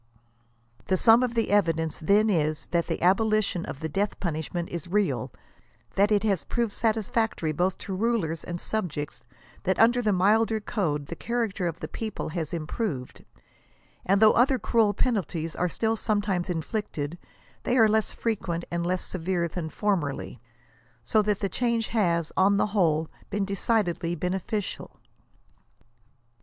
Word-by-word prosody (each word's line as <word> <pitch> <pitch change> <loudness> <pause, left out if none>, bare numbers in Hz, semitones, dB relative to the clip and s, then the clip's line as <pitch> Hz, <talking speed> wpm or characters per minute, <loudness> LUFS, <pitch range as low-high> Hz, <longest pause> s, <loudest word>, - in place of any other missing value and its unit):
I'he 190 - +4
sum 225 +5 +6
of 245 -1 -1
the 230 -3 +1
evidence 165 -6 +1
then 200 +6 +3
is, 155 -6 0
that 170 -1 +1
the - - -3
abolition 205 -1 +2
of 135 - -7
the 160 - -1
death 195 +7 -2
punishment 170 0 -3
is 170 -1 -5
real, 205 +3 0 0.6
that 200 +2 +3
it 205 0 +3
has 195 -8 +1
proved 235 +4 -1
satisfactory 220 -5 0
both 180 +5 0
to 195 - -6
rulers 195 -7 0
and 175 0 -5
subjects, 165 -10 -3 0.4
that 190 -1 0
under 240 +2 +5
the 215 -3 +2
milder 215 +4 +3
code 155 -9 -2
the 170 - -6
character 225 -4 -2
of 165 0 -5
the - - -3
people 220 -7 -5
has 160 -1 -3
improved, 155 - -4 0.8
and 195 +2 +3
though 215 0 +7
other 260 +2 +4
cruel 220 -5 +2
penalties 170 - -1
are 180 - 0
still 225 +6 0
sometimes 205 -5 -1
inflicted, 165 -2 -3 0.4
they 250 - 0
are 225 -2 +7
less 215 0 +1
frequent 185 -7 -2
and 170 0 -1
less 180 +1 -1
severe 175 -1 -1
than 160 -1 -5
formerly, 155 - -2 0.6
so 215 - +3
that 210 -1 0
the 200 - +1
change 235 +1 0
has, 170 -7 +1
on 200 +1 +4
the - - +3
whole, 160 -6 +2 0.2
been 200 -1 -1
decidedly 190 -4 0
beneficial. 185 +4 -3
195 Hz, 150 wpm, -27 LUFS, 170-220 Hz, 0.8 s, though